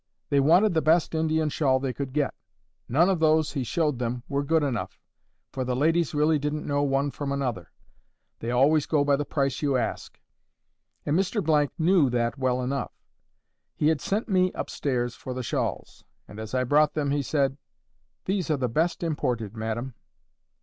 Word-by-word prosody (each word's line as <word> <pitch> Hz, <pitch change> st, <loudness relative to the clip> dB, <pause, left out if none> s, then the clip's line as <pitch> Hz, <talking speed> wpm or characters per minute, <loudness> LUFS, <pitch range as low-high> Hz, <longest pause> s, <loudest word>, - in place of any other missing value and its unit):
They 140 Hz, -, +4 dB
wanted 175 Hz, +9 st, +4 dB
the 160 Hz, -, +2 dB
best 160 Hz, +2 st, +2 dB
Indian 160 Hz, -1 st, +1 dB
shawl 135 Hz, -3 st, +1 dB
they 130 Hz, -1 st, -2 dB
could 135 Hz, -1 st, -5 dB
get. 145 Hz, +1 st, 0 dB, 0.6 s
None 160 Hz, +8 st, +4 dB
of 190 Hz, -3 st, +1 dB
those 155 Hz, -1 st, +3 dB
he 140 Hz, -4 st, -2 dB
showed 150 Hz, 0 st, 0 dB
them 120 Hz, 0 st, -3 dB
were 140 Hz, 0 st, -1 dB
good 160 Hz, +2 st, +1 dB
enough, 115 Hz, -10 st, -3 dB, 0.5 s
for 130 Hz, -, -3 dB
the 125 Hz, 0 st, -1 dB
ladies 160 Hz, +3 st, +1 dB
really 150 Hz, +1 st, +3 dB
didn't 150 Hz, +1 st, -3 dB
know 145 Hz, 0 st, 0 dB
one 140 Hz, 0 st, +1 dB
from 140 Hz, 0 st, -4 dB
another. 120 Hz, -, -3 dB, 0.7 s
They 115 Hz, -, -4 dB
always 140 Hz, +5 st, +3 dB
go 150 Hz, -3 st, +2 dB
by 145 Hz, 0 st, +3 dB
the 145 Hz, +1 st, -2 dB
price 140 Hz, -3 st, -1 dB
you 140 Hz, -3 st, +1 dB
ask, 120 Hz, -, -4 dB, 0.9 s
and 145 Hz, -, +1 dB
Mr— 165 Hz, -, +1 dB
knew 165 Hz, -4 st, +4 dB
that 120 Hz, 0 st, 0 dB
well 130 Hz, -1 st, 0 dB
enough. 135 Hz, 0 st, -3 dB, 0.8 s
He 150 Hz, -, +2 dB
had 160 Hz, -4 st, 0 dB
sent 210 Hz, +3 st, -1 dB
me 185 Hz, -3 st, +2 dB
up -, -, -5 dB
stairs 120 Hz, -4 st, -1 dB
for 130 Hz, 0 st, -7 dB
the 130 Hz, -, -4 dB
shawls, -, -, -3 dB, 0.2 s
and 105 Hz, -, -11 dB
as 110 Hz, +3 st, -5 dB
I 130 Hz, -, +2 dB
brought 150 Hz, +4 st, +3 dB
them 145 Hz, -2 st, 0 dB
he 145 Hz, 0 st, +1 dB
said, 135 Hz, -1 st, 0 dB, 0.7 s
"These 190 Hz, -3 st, -1 dB
are 155 Hz, -, +2 dB
the 130 Hz, -2 st, 0 dB
best 165 Hz, -, 0 dB
imported, 120 Hz, -, -2 dB
madam." 115 Hz, +3 st, -4 dB
145 Hz, 185 wpm, -26 LUFS, 130-160 Hz, 0.9 s, They